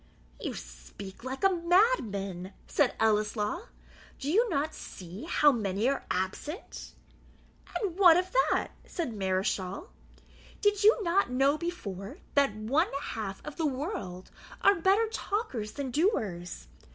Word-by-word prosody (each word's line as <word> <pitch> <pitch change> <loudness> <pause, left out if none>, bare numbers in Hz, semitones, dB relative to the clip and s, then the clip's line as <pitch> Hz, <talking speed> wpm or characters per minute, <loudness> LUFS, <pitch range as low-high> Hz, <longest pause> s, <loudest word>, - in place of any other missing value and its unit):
"You - - -4
speak 60 - -10
like 265 +4 -5
a 390 - +6
madman," 225 - +1
said 285 -4 +2
Ellieslaw; 215 - +1 0.5
"do 285 +2 -2
you 455 +6 +4
not 310 -1 0
see 185 - -9
how 295 -1 +5
many 210 -2 0
are 275 - -1
absent?" 190 - -4 0.8
"And 385 -6 -2
what 350 -4 +8
of 365 +1 -1
that?" - - +2 0.2
said 320 -9 -3
Mareschal. 190 - -1 0.7
"Did 410 -1 +2
you 435 +3 +7
not 360 0 +2
know 270 +3 +3
before, 270 - -5 0.2
that 280 -7 +3
one 265 - +1
half 200 -3 -5
of 300 - -7
the 320 - +1
world 265 - -4 0.3
are 400 - +7
better 390 +5 +3
talkers 400 - -3
than 275 -3 -4
doers? 195 - -1
275 Hz, 130 wpm, -30 LUFS, -, 0.8 s, what